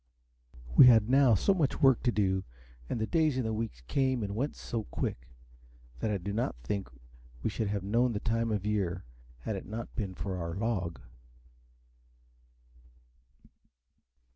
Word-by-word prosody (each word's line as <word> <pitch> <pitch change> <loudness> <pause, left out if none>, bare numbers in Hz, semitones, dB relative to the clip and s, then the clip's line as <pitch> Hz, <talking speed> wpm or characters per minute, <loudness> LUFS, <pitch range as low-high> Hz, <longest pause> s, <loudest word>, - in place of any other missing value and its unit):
WE 125 - +10
had 115 -1 +6
now 135 -4 +6
so 195 - +3
much 160 -8 0
work 135 -3 +6
to 120 - +2
do, 95 -3 +1 0.5
and 120 - -2
the 110 - 0
days 155 0 +2
and 110 -4 -1
weeks 110 - -4
came 130 - 0
and 100 0 -4
went 140 +6 -2
so 115 -3 -4
quick, - - -4 0.7
that 110 - -1
I 105 - 0
do 100 +2 -5
not 115 - -1
think 95 +9 -3 0.5
we - - 0
should 110 - -2
have 100 -1 -2
known 120 +5 +2
the 105 - -2
time 115 0 0
of 105 -2 -1
year 95 -4 -1 0.4
had - - -3
it - - -7
not 110 +3 -6
been 100 -5 -3
for 95 -1 -4
our 85 -1 -4
log. 95 -6 -2
110 Hz, 160 wpm, -30 LUFS, 95-120 Hz, 0.7 s, WE